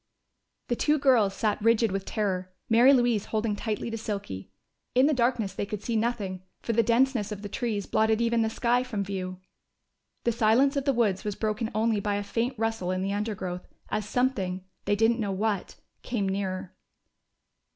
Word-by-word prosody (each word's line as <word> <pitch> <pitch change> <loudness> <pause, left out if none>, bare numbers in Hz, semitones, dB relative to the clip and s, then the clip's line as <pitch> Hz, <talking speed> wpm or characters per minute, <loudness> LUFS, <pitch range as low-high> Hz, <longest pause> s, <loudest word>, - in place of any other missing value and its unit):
_" - - -47
The 240 - 0
two 300 +5 +2
girls 240 -9 +3
sat 210 0 0
rigid 230 -1 +3
with 195 0 -2
terror, 185 -3 -2 0.2
Mary 235 +4 +6
Louise 240 -6 +3
holding 220 -1 -1
tightly 220 +2 -3
to 225 - -4
Silky. 150 - -5 0.4
In 255 +2 +6
the 305 - +3
darkness 240 -6 +1
they 200 - -3
could 210 0 -5
see 235 - -2
nothing, 215 -5 -1 0.2
for 230 - -2
the 230 - +4
denseness 235 -1 +2
of 205 0 -6
the - - -3
trees 215 -4 -2
blotted 220 0 +2
even 235 0 +2
the 220 - +1
sky 240 +2 +1
from 230 -6 -3
view. 185 -2 -4 0.9
The 235 - +2
silence 235 +5 +3
of 280 -1 -1
the 275 - +4
woods 215 -6 +1
was 210 -2 -3
broken 220 +1 -1
only 220 -1 +2
by 205 0 -1
a 205 - -1
faint 235 +5 -2
rustle 225 -4 -1
in 185 0 -1
the 195 +1 -1
undergrowth, 190 -4 -3 0.2
as 210 -1 -2
something 195 -8 0 0.2
they 205 - +2
didn't 225 +3 +3
know 205 -3 -1
what 205 0 -1 0.3
came 220 -6 -2
nearer. 190 -1 -3
215 Hz, 190 wpm, -27 LUFS, 200-235 Hz, 0.9 s, Mary